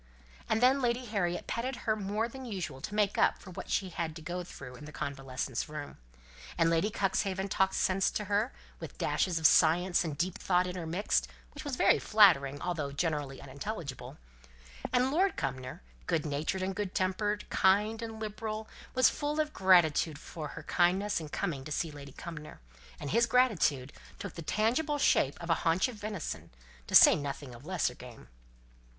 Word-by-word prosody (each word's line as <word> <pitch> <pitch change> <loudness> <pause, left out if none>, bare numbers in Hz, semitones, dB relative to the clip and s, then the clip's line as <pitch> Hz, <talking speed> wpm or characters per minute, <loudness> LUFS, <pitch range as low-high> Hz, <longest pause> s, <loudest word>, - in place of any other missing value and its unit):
And 220 +2 +2
then 265 +2 +5
Lady 245 0 0
Harriet 180 -6 -1
petted 255 +3 -2
her 220 - +2
more 210 +2 -1
than 265 +2 -9
usual 185 - -5
to 205 - -5
make 205 -1 +1
up - - +4
for 185 - -11
what - - -8
she 190 -2 0
had 165 -2 -4
to 165 - -8
go 180 +2 -4
through 135 -7 -10
in 150 - -11
the 155 - -9
convalescent's 135 -2 -4
room; 150 -1 -7 0.6
and 165 -1 +3
Lady 165 +5 +2
Cuxhaven 195 -1 -1
talked 190 0 +1
sense 190 0 +2
to 210 - -3
her, 205 +5 +1 0.3
with - - -9
dashes 180 -3 0
of 160 - -2
science 175 +4 +5
and 155 -4 -4
deep 175 +3 -2
thought 180 -1 +2
intermixed, 180 +2 -1 0.3
which - - -8
was 290 -3 -3
very - - +4
flattering, 160 -10 +5
although 160 -6 -2
generally 145 -3 -2
unintelligible; 140 - -6 0.7
and 250 +2 +2
Lord 375 +6 +2
Cumnor, 130 - -4 0.2
good 155 - 0
natured, 175 +6 -2
good 195 -1 -4
tempered, 205 +3 0
kind, 210 +4 +3
and 225 -1 -6
liberal, 215 0 -4 0.3
was 255 0 +6
full 295 +1 -1
of 305 0 0
gratitude 170 -4 +4
to - - -11
her - - -14
for 155 -3 -6
her 160 +2 -9
kindness 185 +5 +2
in 155 -2 -7
coming 150 -5 -3
to 150 - -9
see 160 +2 -1
Lady 140 -2 -10
Cumnor, 160 -3 -9 0.4
and 140 - -5
his 235 +2 +3
gratitude 170 - +2 0.2
took - - -7
the 170 - -7
tangible 245 - +1
shape 145 - +3
of 170 0 -3
a - - +1
haunch 165 +8 +2
of 255 - -7
venison, 205 -5 -5 0.4
to - - -1
say - - +10
nothing 140 -2 -5
of 120 +6 -12
lesser 180 -9 0
game. 120 - -13
180 Hz, 180 wpm, -31 LUFS, 150-215 Hz, 0.7 s, say